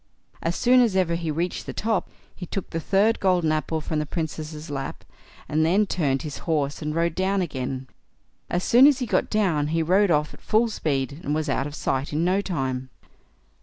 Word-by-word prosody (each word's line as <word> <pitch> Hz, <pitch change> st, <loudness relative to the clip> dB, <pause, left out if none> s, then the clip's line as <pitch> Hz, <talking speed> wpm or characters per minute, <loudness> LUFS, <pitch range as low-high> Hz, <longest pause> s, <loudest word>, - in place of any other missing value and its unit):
As 165 Hz, +1 st, -1 dB
soon 250 Hz, +1 st, +5 dB
as 225 Hz, -6 st, +2 dB
ever 180 Hz, -3 st, +2 dB
he 170 Hz, -1 st, -2 dB
reached 170 Hz, +4 st, -2 dB
the -, -, -4 dB
top, 220 Hz, -2 st, -1 dB, 0.3 s
he 180 Hz, -, -8 dB
took 195 Hz, -, -5 dB
the 165 Hz, -, -2 dB
third 200 Hz, +7 st, +2 dB
golden 180 Hz, -4 st, +2 dB
apple 155 Hz, +1 st, -1 dB
from 155 Hz, 0 st, -2 dB
the 150 Hz, -, -2 dB
Princess' 155 Hz, -1 st, -5 dB
lap, 135 Hz, -1 st, -5 dB, 0.4 s
and 155 Hz, +1 st, +1 dB
then 190 Hz, +6 st, +3 dB
turned 140 Hz, -9 st, 0 dB
his 150 Hz, -3 st, -6 dB
horse 145 Hz, -3 st, 0 dB
and 150 Hz, 0 st, -3 dB
rode 170 Hz, 0 st, +1 dB
down 190 Hz, +3 st, 0 dB
again. 135 Hz, -6 st, -3 dB, 0.6 s
As 175 Hz, +1 st, -1 dB
soon 250 Hz, +4 st, +7 dB
as 290 Hz, -3 st, +4 dB
he 255 Hz, -, -2 dB
got -, -, 0 dB
down, 175 Hz, -9 st, +1 dB
he 165 Hz, +1 st, 0 dB
rode 190 Hz, +4 st, +3 dB
off 150 Hz, -2 st, +1 dB
at -, -, -15 dB
full 225 Hz, +2 st, +2 dB
speed, 140 Hz, -7 st, -2 dB
and 145 Hz, -, -1 dB
was 155 Hz, 0 st, -1 dB
out 135 Hz, -, 0 dB
of 145 Hz, -, -8 dB
sight 135 Hz, +1 st, -2 dB
in 160 Hz, +3 st, +1 dB
no 190 Hz, +3 st, +2 dB
time. 130 Hz, -8 st, -3 dB
165 Hz, 205 wpm, -24 LUFS, 150-190 Hz, 0.6 s, soon